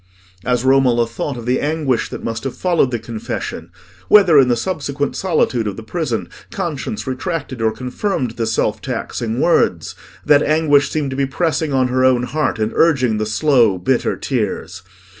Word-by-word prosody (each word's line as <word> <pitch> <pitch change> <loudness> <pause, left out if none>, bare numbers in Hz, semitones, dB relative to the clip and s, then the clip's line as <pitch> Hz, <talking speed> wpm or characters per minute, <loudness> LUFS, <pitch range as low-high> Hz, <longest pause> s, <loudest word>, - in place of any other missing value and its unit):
As 125 0 0
Romola 130 -3 +4
thought 120 +4 -5
of 120 - -8
the 125 +1 +1
anguish 145 -5 -1
that - - -7
must 115 -1 -4
have 135 -2 -5
followed 175 -7 +2
the 120 - -2
confession—whether, 115 - 0
in 130 - +5
the 120 - +2
subsequent 145 0 -3
solitude 140 - 0
of 100 - -4
the 115 - -7
prison, 120 - -3 0.2
conscience 160 - -4
retracted 130 -2 -4
or 110 -1 +2
confirmed 125 - -3
the 115 0 -3
self 110 - 0
taxing 115 +1 -3
words—that 145 - +1
anguish 150 -2 +3
seemed 145 -3 -2
to - - -4
be 135 0 0
pressing 160 +1 -1
on 130 -2 +2
her 130 +1 +1
own 130 -1 +3
heart 150 +2 -1
and 110 0 -1
urging 130 -9 +2
the 110 - -1
slow 115 -3 +3
bitter 120 +8 0
tears. 115 -7 -3
130 Hz, 165 wpm, -18 LUFS, 115-150 Hz, 0.2 s, in